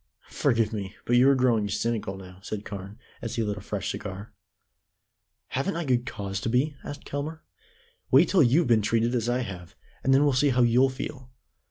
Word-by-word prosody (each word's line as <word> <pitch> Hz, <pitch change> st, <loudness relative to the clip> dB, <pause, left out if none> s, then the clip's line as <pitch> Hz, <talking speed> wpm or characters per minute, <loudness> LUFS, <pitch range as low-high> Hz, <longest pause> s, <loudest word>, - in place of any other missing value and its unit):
"Forgive 115 Hz, -1 st, +1 dB
me, 100 Hz, -3 st, -5 dB
but 120 Hz, -, +2 dB
you 125 Hz, +3 st, +6 dB
are 140 Hz, -, +5 dB
growing 120 Hz, -5 st, +2 dB
cynical 105 Hz, -2 st, -2 dB
now," 95 Hz, -1 st, -12 dB
said 105 Hz, +1 st, -6 dB
Carne, 100 Hz, +1 st, -7 dB, 0.2 s
as 115 Hz, -, -4 dB
he 115 Hz, -, 0 dB
lit 105 Hz, -1 st, -2 dB
a -, -, -7 dB
fresh 100 Hz, 0 st, -3 dB
cigar. 100 Hz, +1 st, -7 dB, 1.2 s
"Haven't 135 Hz, +9 st, -1 dB
I 170 Hz, 0 st, -2 dB
good 125 Hz, -2 st, +1 dB
cause 100 Hz, -2 st, -4 dB
to 115 Hz, -, -2 dB
be?" 135 Hz, +5 st, +1 dB
asked 145 Hz, -, -8 dB
Kelmare. 155 Hz, +3 st, -5 dB, 0.7 s
"Wait 140 Hz, +7 st, +6 dB
till 185 Hz, 0 st, +4 dB
you've 145 Hz, +6 st, +4 dB
been 115 Hz, -3 st, +4 dB
treated 115 Hz, +3 st, +1 dB
as 120 Hz, -1 st, 0 dB
I 125 Hz, +1 st, +1 dB
have, 90 Hz, -7 st, -7 dB, 0.3 s
and 135 Hz, -, +2 dB
then 135 Hz, +2 st, +5 dB
we'll 145 Hz, -2 st, +3 dB
see 135 Hz, +3 st, +3 dB
how 125 Hz, -1 st, +3 dB
you'll 125 Hz, +3 st, +4 dB
feel. 130 Hz, 0 st, -7 dB
120 Hz, 200 wpm, -27 LUFS, 105-135 Hz, 1.2 s, you